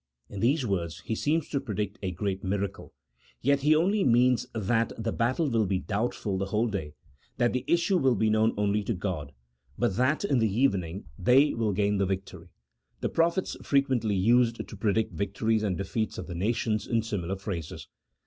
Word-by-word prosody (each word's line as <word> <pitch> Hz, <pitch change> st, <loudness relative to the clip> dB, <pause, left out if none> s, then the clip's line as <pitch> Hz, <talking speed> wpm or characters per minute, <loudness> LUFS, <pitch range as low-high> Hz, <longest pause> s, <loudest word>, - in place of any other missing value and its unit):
In 100 Hz, -, -6 dB
these 135 Hz, +6 st, +2 dB
words 85 Hz, -6 st, -2 dB
he -, -, -4 dB
seems 150 Hz, +7 st, 0 dB
to 140 Hz, -, 0 dB
predict 105 Hz, -5 st, -4 dB
a 95 Hz, -, -2 dB
great 95 Hz, +1 st, -3 dB
miracle, 100 Hz, +1 st, -3 dB, 0.5 s
yet 140 Hz, +2 st, +2 dB
he 150 Hz, +3 st, +4 dB
only 195 Hz, +6 st, +2 dB
means 125 Hz, 0 st, +3 dB
that 115 Hz, +2 st, +1 dB
the 115 Hz, 0 st, -2 dB
battle 130 Hz, +8 st, 0 dB
will 115 Hz, -5 st, +1 dB
be 95 Hz, 0 st, +1 dB
doubtful 105 Hz, -1 st, -2 dB
the 100 Hz, -, -2 dB
whole 105 Hz, +3 st, +1 dB
day, 95 Hz, -9 st, -4 dB, 0.4 s
that 120 Hz, -1 st, +2 dB
the 125 Hz, 0 st, -1 dB
issue 175 Hz, +3 st, +2 dB
will 130 Hz, -4 st, +3 dB
be 110 Hz, +2 st, +1 dB
known 110 Hz, +1 st, +2 dB
only 105 Hz, 0 st, +1 dB
to 115 Hz, -, -1 dB
G 90 Hz, +3 st, -3 dB
od, 75 Hz, -7 st, -4 dB, 0.5 s
but 95 Hz, -, 0 dB
that 130 Hz, +8 st, +2 dB
in 140 Hz, -10 st, +2 dB
the 110 Hz, -3 st, +2 dB
evening 100 Hz, -6 st, 0 dB
they 135 Hz, +9 st, +4 dB
will 115 Hz, -2 st, 0 dB
gain 100 Hz, +1 st, +1 dB
the 100 Hz, -, +2 dB
victory: 95 Hz, 0 st, -5 dB, 0.5 s
the -, -, 0 dB
prophets 170 Hz, +3 st, +1 dB
frequently 130 Hz, -7 st, +1 dB
used 115 Hz, +4 st, +2 dB
to -, -, -9 dB
pre 105 Hz, +1 st, +1 dB
dict 110 Hz, +1 st, 0 dB
victories 105 Hz, +3 st, 0 dB
and 100 Hz, -5 st, -1 dB
defeats 110 Hz, +2 st, -2 dB
of -, -, -5 dB
the 90 Hz, -, -7 dB
nations 110 Hz, +3 st, -1 dB
in 115 Hz, -2 st, +1 dB
similar 95 Hz, -4 st, -3 dB
phrases. 95 Hz, -5 st, -6 dB
110 Hz, 195 wpm, -28 LUFS, 100-125 Hz, 0.5 s, he